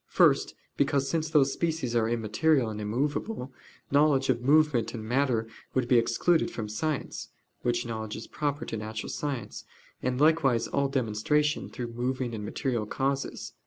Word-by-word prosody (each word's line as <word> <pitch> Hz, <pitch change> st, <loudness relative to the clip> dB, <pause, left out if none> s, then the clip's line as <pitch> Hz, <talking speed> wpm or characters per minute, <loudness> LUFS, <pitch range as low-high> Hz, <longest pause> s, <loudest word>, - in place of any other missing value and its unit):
First, -, -, +3 dB, 0.2 s
because, 140 Hz, -1 st, +2 dB
since 160 Hz, +1 st, -1 dB
those 140 Hz, -3 st, +4 dB
species 160 Hz, -8 st, -1 dB
are 115 Hz, -1 st, +2 dB
immaterial 120 Hz, +3 st, +2 dB
and 105 Hz, 0 st, -5 dB
immovable, 135 Hz, -, -2 dB, 0.4 s
knowledge 140 Hz, -2 st, +4 dB
of 120 Hz, -2 st, +2 dB
movement 140 Hz, -3 st, +3 dB
and 110 Hz, -2 st, -6 dB
matter 120 Hz, -2 st, +1 dB, 0.3 s
would 130 Hz, -2 st, +1 dB
be 125 Hz, -1 st, +5 dB
excluded 140 Hz, +9 st, +2 dB
from 110 Hz, -2 st, -5 dB
science 140 Hz, +7 st, -3 dB, 0.3 s
(which 120 Hz, 0 st, 0 dB
knowledge 110 Hz, -2 st, -4 dB
is 110 Hz, -, -7 dB
proper 145 Hz, -1 st, -2 dB
to 115 Hz, -, -4 dB
natural 110 Hz, +1 st, -5 dB
science), 130 Hz, -8 st, -4 dB, 0.4 s
and 125 Hz, 0 st, -1 dB
likewise 145 Hz, -6 st, +3 dB
all 140 Hz, 0 st, +1 dB
demonstration 135 Hz, +5 st, 0 dB
through 120 Hz, -1 st, -6 dB
moving 125 Hz, 0 st, -2 dB
and 105 Hz, -2 st, -4 dB
material 115 Hz, 0 st, -2 dB
causes. 135 Hz, +3 st, -2 dB
130 Hz, 155 wpm, -28 LUFS, 115-145 Hz, 0.4 s, be